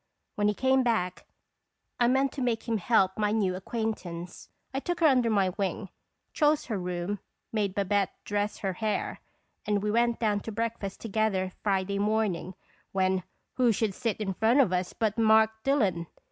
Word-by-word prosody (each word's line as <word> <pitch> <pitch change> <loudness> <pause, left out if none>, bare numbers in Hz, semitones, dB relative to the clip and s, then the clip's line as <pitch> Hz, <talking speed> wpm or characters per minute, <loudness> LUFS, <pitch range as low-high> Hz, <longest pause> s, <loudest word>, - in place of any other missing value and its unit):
When 205 0 +1
he 210 - +1
came 265 +2 +3
back, 220 -7 -1 0.7
I 240 - +4
meant 265 +2 +2
to 275 - -6
make 240 -2 -1
him 225 -2 0
help 190 -1 +2
my 210 -1 +2
new 205 -4 +1
acquaintance. 185 -4 -5 0.2
I 270 - 0
took 350 +4 -3
her 335 - +3
under 255 -5 +4
my 200 -4 +3
wing, 195 0 -3 0.4
chose 300 0 +2
her 220 -4 -2
room, 180 +2 -3 0.3
made 205 -3 0
Babette 200 0 +1
dress 205 0 -1
her 195 -3 -2
hair, 215 +2 -2 0.4
and 205 -1 0
we 210 - 0
went 235 +1 +2
down 210 -3 +1
to 225 - -7
breakfast 220 -3 -3
together 205 -4 0
Friday 200 -1 0
morning, 205 -4 0 0.4
when 190 -1 +1 0.4
who 250 -2 +4
should 215 -1 0
sit 225 +2 -2
in 200 -3 -2
front 225 +7 +3
of 225 -10 +4
us 180 0 0
but 220 -1 -1
Mark 220 0 +5
Dillon 200 - +1
210 Hz, 175 wpm, -28 LUFS, 190-230 Hz, 0.7 s, Mark